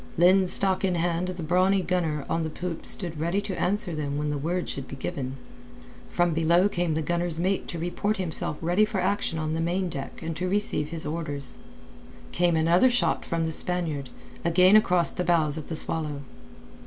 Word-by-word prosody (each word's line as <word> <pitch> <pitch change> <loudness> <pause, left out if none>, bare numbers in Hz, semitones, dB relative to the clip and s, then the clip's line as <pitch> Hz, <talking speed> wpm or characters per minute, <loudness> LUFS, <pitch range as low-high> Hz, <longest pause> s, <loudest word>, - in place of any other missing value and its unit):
Linstock 185 +2 +3
in 185 -2 +1
hand 170 +1 0
the 180 -2 -5
brawny 185 +4 +2
gunner 160 -6 -1
on 165 - 0
the 160 - -2
poop 170 +1 -4
stood 170 -5 0
ready 170 +5 0
to 195 -2 -4
answer 185 -1 +1
them 145 -2 -3
when 150 0 -1
the 150 - -1
word 175 +5 -2
should 135 -1 -5
be - - -7
given. 135 0 -4 0.7
From 175 -1 +1
below 170 +4 +3
came 175 -5 -1
the 160 - -1
gunner's 170 +1 -1
mate 190 +2 0
to 170 - -5
report 175 +6 -1
himself 160 -4 -3
ready 175 +5 +3
for 215 -2 -1
action 185 -3 0
on 155 -1 -2
the 160 - -1
main 180 +2 0
deck 135 -4 -6
and 165 0 -4
to 180 0 -2
receive 195 -6 0
his 165 0 -5
orders. 145 -4 -3 0.8
Came 175 -1 +2
another 170 +9 +4
shot 245 0 +1
from 165 -1 -2
the 160 - -2
Spaniard, 160 -5 -1 0.3
again 180 +4 +5
across 180 -5 +4
the 180 - -2
bows 165 -4 +3
of 155 -3 -5
the 160 - -3
Swallow. 155 -3 -2
170 Hz, 190 wpm, -26 LUFS, 155-180 Hz, 0.8 s, again